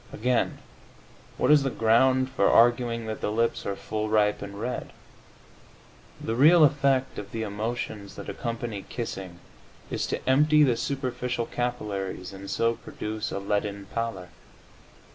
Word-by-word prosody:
Again, 120 Hz, +1 st, 0 dB, 0.8 s
what -, -, +3 dB
is 150 Hz, -1 st, +7 dB
the 135 Hz, -, 0 dB
ground 130 Hz, +3 st, +3 dB
for 100 Hz, -7 st, +3 dB
arguing 120 Hz, 0 st, +3 dB
that 110 Hz, 0 st, -5 dB
the -, -, -1 dB
lips 115 Hz, +2 st, 0 dB
are 100 Hz, -, -1 dB
"full, 110 Hz, +2 st, -3 dB
ripe 105 Hz, -1 st, +2 dB
and 100 Hz, 0 st, -7 dB
red?" 125 Hz, +3 st, -4 dB, 1.3 s
The 110 Hz, -, -3 dB
real 155 Hz, +7 st, +7 dB
effect 135 Hz, -2 st, +2 dB
of 100 Hz, -1 st, -8 dB
the 115 Hz, -1 st, -3 dB
emotions 105 Hz, -1 st, -4 dB
that -, -, -8 dB
accompany 115 Hz, -3 st, -4 dB
kissing 95 Hz, -7 st, -5 dB, 0.5 s
is -, -, -1 dB
to -, -, -4 dB
empty 150 Hz, +3 st, +5 dB
the 125 Hz, -5 st, +3 dB
superficial 125 Hz, -3 st, -2 dB
capillaries 100 Hz, -7 st, -3 dB
and 95 Hz, 0 st, -9 dB
so 115 Hz, 0 st, +1 dB
produce 110 Hz, -1 st, -5 dB
a -, -, -3 dB
leaden 100 Hz, 0 st, -2 dB
pallor. 115 Hz, -6 st, -3 dB
115 Hz, 145 wpm, -27 LUFS, 105-125 Hz, 1.3 s, is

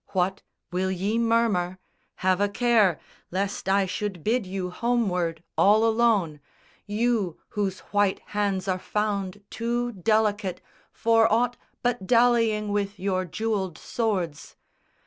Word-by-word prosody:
What, 190 Hz, +1 st, 0 dB, 0.3 s
will 185 Hz, +1 st, 0 dB
ye 195 Hz, +5 st, -1 dB
murmur? 225 Hz, -6 st, +1 dB, 0.5 s
Have 185 Hz, +1 st, +3 dB
a 205 Hz, -, +2 dB
care, 215 Hz, -5 st, +3 dB, 0.3 s
Lest 190 Hz, +1 st, -2 dB
I 195 Hz, 0 st, +3 dB
should 185 Hz, -2 st, -4 dB
bid 225 Hz, -2 st, +1 dB
you 185 Hz, -1 st, -4 dB
homeward 180 Hz, -7 st, 0 dB
all 215 Hz, +3 st, +5 dB
alone, 220 Hz, -9 st, +2 dB, 0.5 s
You 210 Hz, -4 st, 0 dB
whose 195 Hz, -3 st, -2 dB
white 205 Hz, -2 st, +2 dB, 0.2 s
hands 200 Hz, -2 st, 0 dB
are 185 Hz, -1 st, 0 dB
found 205 Hz, -1 st, -2 dB
too 240 Hz, +1 st, -1 dB
delicate 210 Hz, -1 st, 0 dB, 0.3 s
For 225 Hz, 0 st, +3 dB
aught 240 Hz, +2 st, +2 dB, 0.3 s
but 245 Hz, -6 st, -1 dB
dallying 230 Hz, -3 st, +3 dB
with 205 Hz, 0 st, -1 dB
your 185 Hz, -1 st, 0 dB
jewelled 190 Hz, -1 st, -2 dB
swords! 185 Hz, -10 st, -3 dB
205 Hz, 125 wpm, -26 LUFS, 185-225 Hz, 0.5 s, all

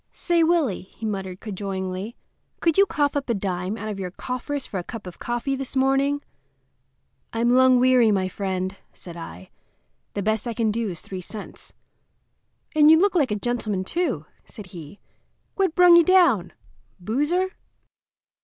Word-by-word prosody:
"Say, 340 Hz, -1 st, +1 dB
Willie," 320 Hz, -, +2 dB, 0.2 s
he 225 Hz, -, -6 dB
muttered 190 Hz, -3 st, -4 dB
cajolingly, 195 Hz, +1 st, -4 dB, 0.4 s
"could 330 Hz, -2 st, +2 dB
you 395 Hz, 0 st, +5 dB
cough 290 Hz, -3 st, 0 dB
up 280 Hz, -2 st, -2 dB
a 235 Hz, -, +2 dB
dime 190 Hz, +1 st, -3 dB
out 215 Hz, -, -6 dB
of 205 Hz, -2 st, -4 dB
your 185 Hz, -2 st, -3 dB
coffers 255 Hz, +7 st, -4 dB
for 195 Hz, -, -4 dB
a -, -, -5 dB
cup 225 Hz, +2 st, -8 dB
of 180 Hz, -, -10 dB
coffee 240 Hz, +3 st, -2 dB
this 270 Hz, 0 st, -6 dB
morning?" 270 Hz, +2 st, +2 dB, 1.1 s
"I'm 230 Hz, +1 st, +1 dB
lung 255 Hz, 0 st, +5 dB
weary, 250 Hz, -2 st, +5 dB
my 190 Hz, -3 st, +1 dB
friend," 190 Hz, 0 st, -3 dB, 0.2 s
said 170 Hz, -2 st, -11 dB
I. 95 Hz, -, -10 dB, 0.6 s
"The 200 Hz, -, -2 dB
best 220 Hz, +2 st, 0 dB
I 235 Hz, -, -3 dB
can 225 Hz, -1 st, +1 dB
do 225 Hz, 0 st, -2 dB
is 175 Hz, -, -6 dB
three 185 Hz, -1 st, -7 dB
cents." 210 Hz, +3 st, -10 dB, 1.0 s
"And 300 Hz, 0 st, +7 dB
you 320 Hz, -, +8 dB
look 390 Hz, +2 st, +3 dB
like 305 Hz, -7 st, +2 dB
a 210 Hz, -, 0 dB
gentleman, 215 Hz, -3 st, -2 dB
too," 345 Hz, -, -2 dB, 0.2 s
said 210 Hz, -4 st, -11 dB
he. 165 Hz, +2 st, -10 dB, 0.5 s
"What 380 Hz, -4 st, 0 dB
brung 360 Hz, -1 st, +7 dB
you 340 Hz, -, +7 dB
down?—boozer?" 295 Hz, -, +1 dB
230 Hz, 165 wpm, -24 LUFS, 195-285 Hz, 1.1 s, you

